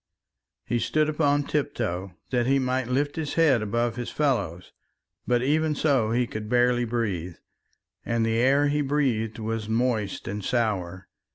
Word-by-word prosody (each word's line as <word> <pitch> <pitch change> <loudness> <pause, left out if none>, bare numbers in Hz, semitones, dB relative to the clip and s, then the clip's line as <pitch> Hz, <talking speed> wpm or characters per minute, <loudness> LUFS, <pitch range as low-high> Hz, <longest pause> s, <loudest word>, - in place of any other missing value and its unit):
He 120 - 0
stood 155 +5 +1
upon 145 -2 +2
tiptoe 100 - -2 0.2
that 120 -2 +1
he 135 +1 +4
might 130 -1 0
lift 145 +4 -1
his 155 -3 -3
head 150 -8 +4
above 115 +3 -1
his 120 -1 -4
fellows, 100 - -1 0.6
but 125 0 +2
even 155 +2 +1
so 135 -8 +2
he 120 +2 +1
could 110 -2 -6
barely 120 0 +3
breathe, 100 -8 -2 0.7
and 115 -1 0
the 115 0 +1
air 140 +4 +4
he 150 +1 +1
breathed 130 -6 0
was 110 -1 -3
moist 110 -3 -1
and 105 +1 -4
sour. 95 -6 -1
120 Hz, 155 wpm, -26 LUFS, 110-140 Hz, 0.7 s, he